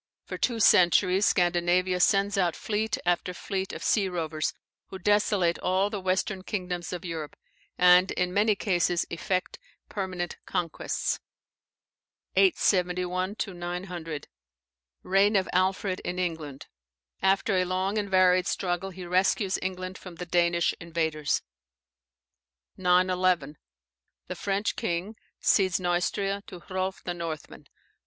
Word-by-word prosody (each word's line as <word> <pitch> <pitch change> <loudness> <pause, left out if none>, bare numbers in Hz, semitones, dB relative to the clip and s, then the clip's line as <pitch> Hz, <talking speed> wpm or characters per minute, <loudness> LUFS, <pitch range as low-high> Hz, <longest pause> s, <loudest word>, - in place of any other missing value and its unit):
For - - -6
two 235 -2 0
centuries 185 0 +5
Scandinavia 180 +1 +2
sends 200 +2 +3
out 180 -4 +1
fleet 215 +1 -1
after 175 +1 0
fleet 190 0 -3
of - - -7
sea 200 -4 +2
rovers, 160 -3 -2 0.4
who 190 - -8
desolate 195 -2 +2
all 190 +3 +1
the 205 -3 -4
western 185 +1 -1
kingdoms 180 -3 -4
of 180 0 -5
Europe, 160 -3 -5 0.4
and 180 +1 +6
in 180 0 -1
many 210 +1 +3
cases 175 -3 +1
effect 180 +2 -2 0.3
permanent 185 -3 -4
conquests. 170 -3 -2 1.2
871 185 - +2
900. 175 -4 -6 0.8
Reign 195 +3 +3
of 190 -1 +2
Alfred 185 +1 +1
in 180 - -4
England. 160 -6 -4 0.6
After 195 +1 +2
a 185 - +2
long 190 +3 -1
and 200 -1 -3
varied 185 -1 +4
struggle, 180 +1 -1
he 185 -1 -9
rescues 185 +2 +1
England 185 0 -4
from 180 -2 -10
the 180 - -6
Danish 170 0 +2
invaders. 160 -3 -1 1.3
911, 180 -4 +2 0.7
The - - -5
French 200 +1 -1
king 175 +6 -3 0.2
cedes 190 -2 +3
Neustria 190 +3 0
to 180 - -9
Hrolf 190 0 -4
the 175 - -3
Northman. 165 -3 -7
185 Hz, 120 wpm, -27 LUFS, 175-195 Hz, 1.3 s, and